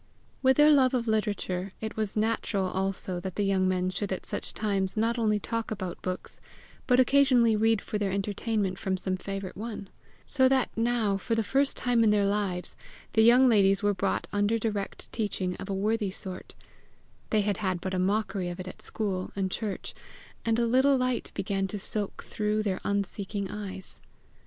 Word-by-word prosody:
With 265 -1 +4
their 300 +1 +7
love 265 -3 +5
of 240 -2 -1
literature, 200 -3 -1
it 220 -1 -5
was 215 -1 -1
natural 215 -2 0
also 190 -1 -2
that 185 0 -6
the 205 - 0
young 190 -1 +2
men 185 0 0
should 195 +2 -3
at 185 - -3
such - - -6
times 195 -2 0
not 230 +2 +1
only 215 -2 +2
talk 230 +2 -3
about 190 -5 -5
books, 185 0 -4 0.5
but 250 -1 +4
occasionally 255 -4 +5
read 225 0 +2
for 210 - -3
their 200 -2 0
entertainment 200 0 -1
from 190 -1 -1
some 185 0 -2
favourite 195 0 -5
one; 210 -2 -6 0.4
so 260 -2 +3
that 265 -1 +2
now, 225 -3 +1
for 225 +4 -1
the 225 - +1
first 275 +5 +1
time 245 -2 +2
in 220 - +5
their 205 -1 +3
lives, 200 -3 -1 0.4
the 220 - +5
young 245 +3 +7
ladies 195 -3 +4
were 205 0 +3
brought 110 - -1
under 205 +2 +2
direct 210 -3 -3
teaching 190 -5 -2
of 195 - -8
a - - -1
worthy 210 +1 0
sort 185 0 -7 0.7
they 215 - +3
had 205 -1 0
had 185 -4 -1
but 190 +1 -4
a 185 - 0
mockery 195 -1 0
of 175 - -6
it 185 - -6
at 185 - -9
school 190 -4 -3
and 190 -1 -1
church 210 -2 -4 0.5
and 225 0 +1
a 235 - +2
little 260 +4 +4
light 255 -1 -1
began 195 0 -1
to 205 - -5
soak 205 0 -4
through 215 0 -1
their 190 -3 -1
unseeking 200 0 -2
eyes. 190 -2 -7
205 Hz, 190 wpm, -28 LUFS, 190-225 Hz, 0.7 s, their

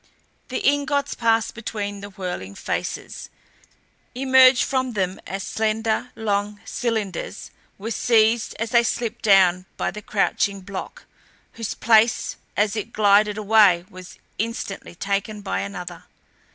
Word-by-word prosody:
The 255 - -1
ingots 285 0 +1
passed 225 -1 +1
between 205 -3 -5
the 205 - -8
whirling 180 - -6
faces; - - -4 0.9
emerged 260 -1 +6
from 260 -2 -1
them 190 -2 -2
as 195 +1 -4
slender, 220 +3 -1
long 205 -1 -2
cylinders; 220 -6 -3 0.3
were 220 +4 -5
seized 225 0 +2
as 230 0 -3
they 235 -2 +6
slipped 235 0 -2
down 190 -3 +4
by - - -1
a 210 +4 -8
crouching 200 -1 0
block, 190 0 -7 0.5
whose 230 -2 -5
place 225 0 +3 0.2
as 210 0 +2
it 220 +1 -5
glided 210 0 +4
away 205 -5 +4
was 185 0 -11 0.2
instantly 225 -5 -4
taken 200 +3 -2
by 195 - -2
another. 195 -3 -6
215 Hz, 125 wpm, -23 LUFS, 200-230 Hz, 0.9 s, emerged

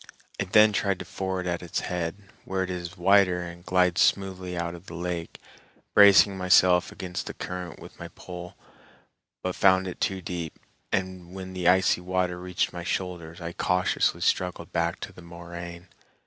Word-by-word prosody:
I - - 0
then 105 +3 +6
tried 100 -1 +1
to - - -7
ford 95 -1 -3
at 85 -1 -2
its 85 -2 -3
head, 85 -1 -3 0.3
where 95 0 -1
it 95 - -4
is 90 -1 -6
wider 90 -1 +4
and 85 0 -9
glides 90 -1 +2
smoothly 95 -2 +1
out 85 0 -2
of 85 +2 -12
the 85 - -8
lake, 85 -1 -4 0.5
bracing 100 -1 +7
myself 90 -1 +4
against 90 -1 -5
the - - -6
current 90 -2 -6
with - - -13
a - - -6
pole, 90 -1 -9 0.9
but 90 - -1
found 95 0 +4
it 90 - -7
too 95 -1 0
deep, 85 -3 -5 0.3
and 95 -1 -3
when 95 -1 -7
the 90 -2 -1
icy 95 0 +4
water 90 0 -1
reached 90 0 -1
my 85 -1 -6
shoulders 85 -2 -4
I 85 0 -6
cautiously 90 +1 +1
struggled 90 -2 0
back 85 +1 0
to 100 - -6
the 90 - -13
moraine. 85 +1 -9
90 Hz, 175 wpm, -26 LUFS, 85-95 Hz, 0.9 s, bracing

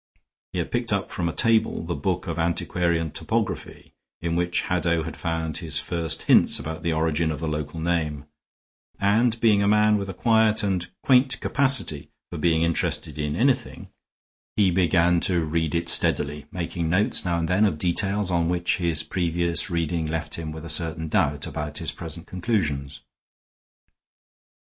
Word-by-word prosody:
He - - -5
had - - -2
picked - - -1
up - - -1
from 85 -1 -1
a - - -2
table 115 0 +2
the 85 +1 -3
book 90 -1 -2
of 85 -2 -4
antiquarian 85 -1 0
topography, - - -3 0.3
in 85 0 -2
which 90 0 0
Haddow 85 -2 0
had 80 - -6
found 80 -2 -3
his 80 -3 -1
first 80 0 -3
hints - - +5
about 80 +3 -5
the 85 +1 -1
origin 80 0 0
of 80 - -3
the 80 - -3
local 75 +1 -4
name, 80 -4 -1 0.7
and, 110 +4 +2
being 110 -3 +4
a 100 - +2
man 105 0 +4
with 100 -1 -5
a 95 - -6
quiet 110 0 +3
and 90 -3 -1
quaint 130 0 +3
capacity 135 - +1 0.2
for 85 - -5
being 80 +1 +2
interested 85 -2 -1
in 75 0 -2
anything, 130 +6 0 0.7
he 100 -3 +3
began 85 -1 +3
to 85 -2 0
read 80 +1 -1
it 85 0 -1
steadily, 75 -2 +2
making 85 -2 -3
notes 95 +5 +2
now 85 -1 0
and 85 -1 -1
then 90 +5 +2
of 100 -8 +2
details 95 +3 0
on 85 -1 +1
which 90 0 0
his 85 -3 0
previous 85 +1 -1
reading 85 -1 -1
left 80 +1 -4
him 80 -2 -4
with 80 +1 -8
a - - -6
certain 80 0 -1
doubt 75 -2 +1
about 75 -1 -5
his - - -3
present 85 0 -7
conclusions. 75 - -2
85 Hz, 170 wpm, -24 LUFS, 80-95 Hz, 0.7 s, hints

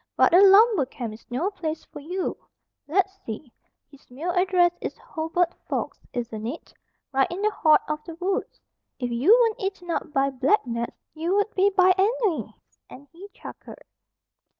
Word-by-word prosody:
"But - - +4
a 360 - +8
lumber 400 - +6
camp 240 -4 -6
is 220 - -15
no 300 +12 -1
place 320 -5 -5
for - - -11
you. 355 +6 -3 0.5
Let's 385 +4 0
see, 235 +3 -8 0.4
his 280 - -19
mail 300 +8 -4
address 360 -1 +3
is - - -5
Hobart 330 +2 -1 0.2
Forks, - - -3
isn't 225 -2 -4
it? 290 +8 -7 0.4
Right 270 -1 +2
in 365 +4 -5
the 425 - +3
heart 310 -6 +4
of 305 0 -3
the 330 - -9
woods. 370 +3 -3 0.4
If 245 -2 -3
you 240 +9 0
weren't 455 -3 +2
eaten 385 -3 -4
up 325 - -3
by 275 -1 +1
black 270 +8 +2
gnats, 235 -1 -4 0.2
you 330 +5 -1
would 410 +2 +1
be 390 +1 +3
by 370 -1 +4
ennui," 425 -4 +1 0.4
and 280 +2 -13
he 375 +4 -12
chuckled. - - -11
340 Hz, 175 wpm, -25 LUFS, 275-385 Hz, 0.5 s, a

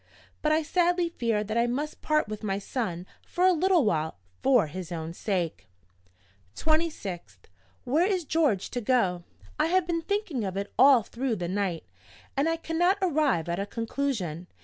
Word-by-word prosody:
but 305 - +2
I 315 +1 +3
sadly 350 +2 +2
fear 230 -9 0
that 215 +2 -1
I 235 - +3
must 290 +5 -3
part 305 -4 +1
with 215 0 -6
my 195 -3 -1
son 195 -4 -3 0.2
for 360 - 0
a 370 - +7
little 355 -3 +3
while, 160 - 0 0.2
for 255 -7 +4
his 175 +3 -7
own 165 -1 -4
sake. 175 - -2 0.9
"26th. 210 - -1 0.5
Where 310 +9 +2
is 370 -5 0
George 290 - +1
to 245 - -2
go? 195 -8 +1 0.3
I 305 - +3
have 365 +1 +2
been 340 -1 -1
thinking 400 - -2
of 190 -1 -3
it 200 - -4
all 260 -3 +7
through 240 +2 -2
the 175 -4 -3
night, 185 -3 -1 0.5
and 285 +4 +2
I 330 - +1
cannot 340 +4 +1
arrive 300 - +1
at 170 +2 -2
a 200 - -2
conclusion. 220 - -3
245 Hz, 170 wpm, -27 LUFS, -, 0.9 s, a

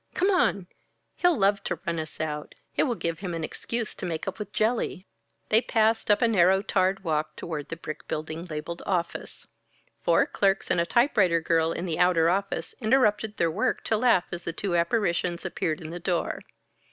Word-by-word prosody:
Come 380 +3 +3
on! 200 - +2 0.5
He'll 355 -2 +3
love 200 0 +2
to - - -2
run 170 -2 -1
us 155 -1 -7
out. 150 -1 -4 0.2
It - - +3
will 245 -4 0
give 170 -5 -3
him 180 -4 -4
an 165 - -4
excuse 230 +7 -3
to - - -6
make 160 0 -4
up 195 - -4
with 205 -1 -6
Jelly." 215 -4 0 0.4
They 220 +1 +5
passed 225 -2 +1
up 210 +4 +4
a - - +5
narrow 190 -2 +4
tarred 190 -1 +1
walk 155 -3 -1
toward 155 -4 -5
the - - -4
brick 155 -2 -8
building 155 +2 -4
labeled 165 +1 -6
"Office." 175 -3 -3 0.6
Four - - +4
clerks 195 -1 0
and 170 - +3
a 170 - -1
typewriter 215 - +3
girl 165 0 +1
in 170 - -3
the 165 -3 -2
outer 170 -2 +4
office 195 -3 -2
interrupted 220 -3 +2
their 165 -1 +2
work 200 +7 -1
to 220 - +1
laugh 225 -6 +3
as 175 - -4
the 170 - -4
two 180 +1 -2
apparitions 175 -1 0
appeared 160 -3 -2
in 160 -1 -7
the 175 - -6
door. 175 0 -1
180 Hz, 195 wpm, -26 LUFS, 165-210 Hz, 0.6 s, They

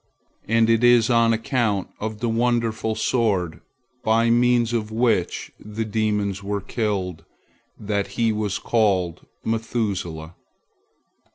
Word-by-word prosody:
And 115 +1 +3
it 115 +1 +3
is 120 -1 +5
on 115 -1 +4
account 115 -3 0
of 110 0 -5
the 120 - 0
wonderful 115 -1 0
sword 105 -7 0 0.4
by 115 +1 +3
means 120 -1 +3
of 110 -2 -1
which 110 -5 0
the 105 +2 -5
demons 105 -2 -1
were 100 0 -2
killed 95 -5 -3 0.6
that 100 -1 -1
he 115 -1 +2
was 105 -2 -1
called 95 -7 0 0.2
Methuselah. 100 -8 -2
110 Hz, 115 wpm, -23 LUFS, 100-115 Hz, 0.6 s, is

